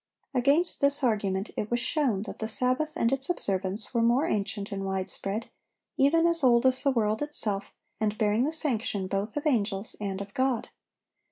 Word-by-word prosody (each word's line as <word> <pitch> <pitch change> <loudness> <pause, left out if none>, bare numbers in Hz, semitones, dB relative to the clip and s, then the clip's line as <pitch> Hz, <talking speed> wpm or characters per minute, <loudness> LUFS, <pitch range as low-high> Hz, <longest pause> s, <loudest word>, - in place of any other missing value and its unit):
Against 280 +7 +2
this 280 0 +2
argument 200 -4 0
it 210 - -3
was 240 - +1
shown 235 -5 0
that - - -8
the 220 - -2
Sabbath 255 +7 0
and 230 - +1
its 270 +2 -1
observance 195 - -2
were 235 - +2
more 240 +6 +3
ancient 205 -4 -2
and 195 -1 -3
widespread, 195 +3 -3 0.5
even 320 +4 +4
as 335 -2 +2
old 240 -1 +5
as 260 0 +5
the 280 - +2
world 220 -3 +1
itself, 210 -9 -2 0.3
and 215 -1 0
bearing 215 +2 +2
the 295 - 0
sanction 230 -10 -1
both 200 +6 -3
of 295 - -3
angels 215 -7 0
and 195 -2 -3
of 200 0 -7
God. 260 -2 0
230 Hz, 180 wpm, -28 LUFS, 200-270 Hz, 0.5 s, old